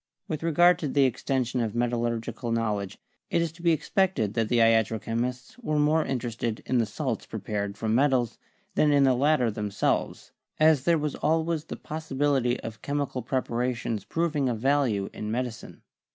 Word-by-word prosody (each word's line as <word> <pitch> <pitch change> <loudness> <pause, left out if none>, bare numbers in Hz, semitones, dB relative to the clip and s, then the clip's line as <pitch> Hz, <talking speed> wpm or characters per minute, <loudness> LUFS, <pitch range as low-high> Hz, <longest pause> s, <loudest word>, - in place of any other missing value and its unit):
With 155 - -3
regard 175 +2 +4
to 155 - -2
the 140 0 +3
extension 130 -1 0
of 115 -1 -2
metallurgical 120 -1 -1
knowl 115 -3 0
edge, 100 -2 -7 0.3
it - - +1
is 170 -2 0
to 165 +1 -16
be 170 -1 +3
expected 160 - +1
that 115 -2 0
the 120 - +2
iatro 115 -1 +3
chemists 125 - -4
were 155 -11 -1
more 155 +2 +3
interested 120 -4 -3
in 125 - +1
the 115 - +1
salts 125 +1 -3
prepared 100 -1 -4
from 110 0 -1
metals 130 -2 +2 0.3
than 150 - +3
in 140 -1 +5
the 135 -1 +5
latter 130 -2 +2
themselves, 105 -1 -2 0.3
as 155 -3 +4
there 170 -1 +4
was 150 -1 -2
always 160 0 0
the - - -6
possibility 140 -5 -1
of 110 -2 -8
chemical 145 -3 -2
preparations 120 -3 -2
proving 155 -5 0
of 120 - -1
value 125 -6 +1
in 105 - -5
medicine. 120 0 -5
125 Hz, 170 wpm, -27 LUFS, 115-150 Hz, 0.3 s, in